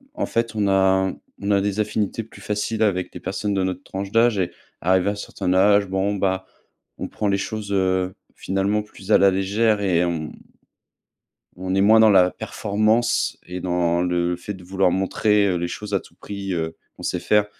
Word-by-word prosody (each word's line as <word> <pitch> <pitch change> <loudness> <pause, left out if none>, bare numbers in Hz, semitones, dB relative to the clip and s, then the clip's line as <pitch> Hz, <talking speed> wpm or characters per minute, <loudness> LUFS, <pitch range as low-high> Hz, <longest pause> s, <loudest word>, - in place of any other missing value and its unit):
en 300 - -1
fait, 115 -1 -1
on 105 -2 +1
a 95 -1 +3 0.3
on 100 +1 -2
a 100 -1 +3
des 100 +1 -2
affinités 105 +1 -1
plus 115 - -15
faciles 105 +1 -2
avec 95 -4 +1
des - - -7
personnes 100 +2 -3
de 95 -1 +1
notre 95 0 -3
tranche 95 +1 -5
d'âge 115 -2 +3
et 90 - 0 0.3
arrivé 95 +2 +2
à - - +1
un - - -5
certain 95 -2 -3
âge, 100 +2 +5
bon, 95 +2 0
bah, 95 -1 -1 0.5
on - - -4
prend 105 - -3
les 100 -1 +2
choses, 105 0 -4
heu, 95 -1 +1 0.2
finalement, 100 +2 0
plus 105 -1 -9
à - - +8
la 100 - +6
légère 100 +3 +1
et 90 -4 +2
on 80 -3 -3 1.3
on 95 0 -2
est 95 - +3
moins 110 +3 +6
dans 110 -1 +7
la 90 -2 +5
performance 110 +6 0
et 90 +1 -5
dans 85 -1 +1
le 90 0 0
fait 100 +4 -6
de 95 - -12
vouloir 95 0 +1
montrer, 100 +2 +2
heu, 90 - +1
les 85 0 -1
choses 105 +4 -7
à - - +4
tout - - -19
prix, 100 -1 -6
heu, 80 -2 -3 0.2
qu'on - - -11
sait - - -1
faire. 105 -1 +3
95 Hz, 205 wpm, -22 LUFS, 95-105 Hz, 1.3 s, à